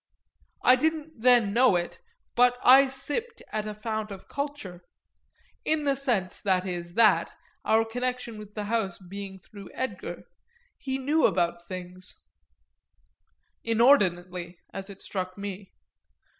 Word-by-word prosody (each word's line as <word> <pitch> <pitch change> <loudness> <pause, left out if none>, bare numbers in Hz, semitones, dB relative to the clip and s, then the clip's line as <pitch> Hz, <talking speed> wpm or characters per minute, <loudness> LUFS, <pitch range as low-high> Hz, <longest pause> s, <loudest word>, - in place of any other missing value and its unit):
I 250 - +7
didn't 315 -2 -2
then 240 -4 +5
know 245 -3 +5
it, 175 0 -2 0.3
but 245 0 +4
I 270 +2 +8
sipped 290 - -2
at 215 0 -2
a 210 - -5
fount 215 0 -4
of 195 -2 -10
culture; 280 -12 -5 0.8
in 310 -1 +1
the 280 -1 +2
sense, 235 - +1
that 185 -2 +1
is, 175 -1 -5
that, 225 -2 +4 0.3
our 225 +1 +3
connection 245 -1 -3
with 210 -1 -12
the 210 - -3
house 205 -4 -1
being 195 +1 -8
through 195 +1 -13
Edgar, 260 - -5 0.6
he 265 -1 -3
knew 290 +4 +3
about 170 -1 -1
things 185 +1 -8 1.4
inordinately, 185 -8 +2 0.2
as 195 +1 -6
it 195 -1 -10
struck 185 -1 -4
me. 200 -1 -7
215 Hz, 130 wpm, -27 LUFS, 185-255 Hz, 1.4 s, I